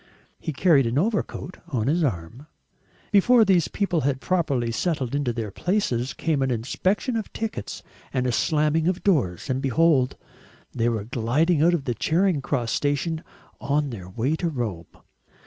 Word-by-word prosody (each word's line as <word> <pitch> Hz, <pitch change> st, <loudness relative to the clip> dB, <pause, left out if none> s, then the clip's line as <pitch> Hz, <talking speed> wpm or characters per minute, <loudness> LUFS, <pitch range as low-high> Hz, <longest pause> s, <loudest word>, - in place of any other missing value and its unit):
He -, -, -4 dB
carried 140 Hz, -4 st, +4 dB
an 115 Hz, +3 st, -1 dB
overcoat 195 Hz, -1 st, -1 dB
on 115 Hz, -6 st, -1 dB
his 160 Hz, +6 st, +2 dB
arm. 115 Hz, -, -3 dB, 0.6 s
Before 225 Hz, +3 st, +5 dB
these 180 Hz, -5 st, +3 dB
people 185 Hz, -6 st, -1 dB
had 135 Hz, -1 st, 0 dB
properly 140 Hz, -9 st, 0 dB
settled 135 Hz, -2 st, -1 dB
in 145 Hz, 0 st, 0 dB
their 115 Hz, -4 st, -2 dB
places, 135 Hz, -, -1 dB
came 155 Hz, -4 st, 0 dB
an 135 Hz, -, +1 dB
inspection 185 Hz, -, -1 dB
of 220 Hz, -2 st, -3 dB
tickets 220 Hz, -, -5 dB, 0.3 s
and 130 Hz, -1 st, -1 dB
a 125 Hz, -, +1 dB
slamming 155 Hz, +4 st, +1 dB
of 185 Hz, 0 st, -1 dB
doors, 130 Hz, -, +1 dB
and 130 Hz, -1 st, -1 dB
behold! 135 Hz, -1 st, +2 dB, 0.6 s
they 120 Hz, -1 st, +1 dB
were 110 Hz, -3 st, -2 dB
gliding 130 Hz, -, +1 dB
out 175 Hz, +2 st, +5 dB
of 145 Hz, -5 st, -4 dB
Charing 170 Hz, -, +2 dB
Cross 120 Hz, -5 st, -1 dB
station 150 Hz, +3 st, -1 dB, 0.4 s
on 145 Hz, 0 st, 0 dB
their 95 Hz, -6 st, -8 dB
way 120 Hz, +10 st, -1 dB
to 170 Hz, -, -1 dB
Rome. 110 Hz, -, -4 dB
145 Hz, 160 wpm, -24 LUFS, 120-170 Hz, 0.6 s, Before